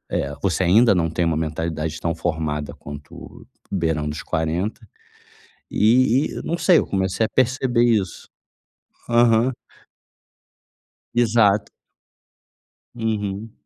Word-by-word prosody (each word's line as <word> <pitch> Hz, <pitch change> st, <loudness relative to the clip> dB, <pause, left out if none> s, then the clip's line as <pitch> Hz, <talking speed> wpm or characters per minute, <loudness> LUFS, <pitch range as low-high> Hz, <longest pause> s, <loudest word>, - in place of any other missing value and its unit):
eh, 70 Hz, +1 st, -2 dB
você 95 Hz, -1 st, +1 dB
ainda 105 Hz, +5 st, +5 dB
não 85 Hz, -2 st, +1 dB
tem 85 Hz, +1 st, 0 dB
uma 80 Hz, -2 st, 0 dB
mentalidade 80 Hz, 0 st, -3 dB
tão 85 Hz, 0 st, -1 dB
formada 80 Hz, -3 st, -3 dB
quanto 75 Hz, 0 st, -11 dB, 0.3 s
beirando 80 Hz, -5 st, -1 dB
os 75 Hz, -, -7 dB
40, 80 Hz, +6 st, -2 dB, 1.0 s
e 125 Hz, +5 st, +4 dB
e -, -, -6 dB
não 170 Hz, -, -2 dB
sei. 180 Hz, -1 st, +5 dB
Eu -, -, 0 dB
comecei 95 Hz, +2 st, 0 dB
a -, -, -11 dB
perceber 130 Hz, -1 st, +2 dB
isso. 110 Hz, -6 st, 0 dB, 0.8 s
Aham. 120 Hz, +1 st, +4 dB, 1.6 s
Exato. 110 Hz, -3 st, +3 dB, 1.3 s
Uhum. 110 Hz, -2 st, -3 dB
95 Hz, 110 wpm, -22 LUFS, 80-115 Hz, 1.6 s, ainda